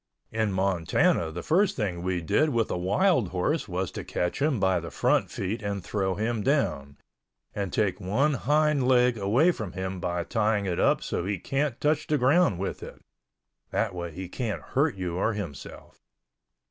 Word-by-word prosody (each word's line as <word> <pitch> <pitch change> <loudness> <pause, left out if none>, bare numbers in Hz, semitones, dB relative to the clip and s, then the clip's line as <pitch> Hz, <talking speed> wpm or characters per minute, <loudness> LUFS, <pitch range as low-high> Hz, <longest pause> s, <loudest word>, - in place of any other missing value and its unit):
In 110 -2 0
Montana 90 -3 +1
the 90 +2 -6
first 185 +5 +2
thing 95 -7 -2
we 90 -1 -1
did 155 - +2
with 115 -5 0
a - - 0
wild 105 - +2
horse 95 - -1
was 90 -1 -2
to - - -6
catch 90 +8 -2
him 145 -5 +2
by 95 -2 +2
the 85 0 -7
front - - +1
feet 100 +4 -3
and 100 -2 -3
throw 95 -2 -1
him 110 +2 -1
down, 70 - 0 0.6
and 100 -3 -3
take 105 -2 0
one 130 +11 +1
hind 145 +2 +2
leg 125 -1 +4
away 115 - +3
from 110 - -6
him 95 0 -4
by 85 0 -2
tying 105 0 0
it 90 -3 -1
up - - +3
so - - -2
he 100 +2 -2
can't 135 - -2
touch 150 +1 +1
the 150 - +2
ground 135 - +3
with 95 - -4
it - - -9 0.7
(that 110 -4 -1
way 85 -1 -5
he 95 +3 -7
can't 110 +3 -4
hurt 140 -1 +2
you 90 -2 -3
or 110 +4 +1
himself). 90 - -8
100 Hz, 185 wpm, -27 LUFS, 90-130 Hz, 0.7 s, leg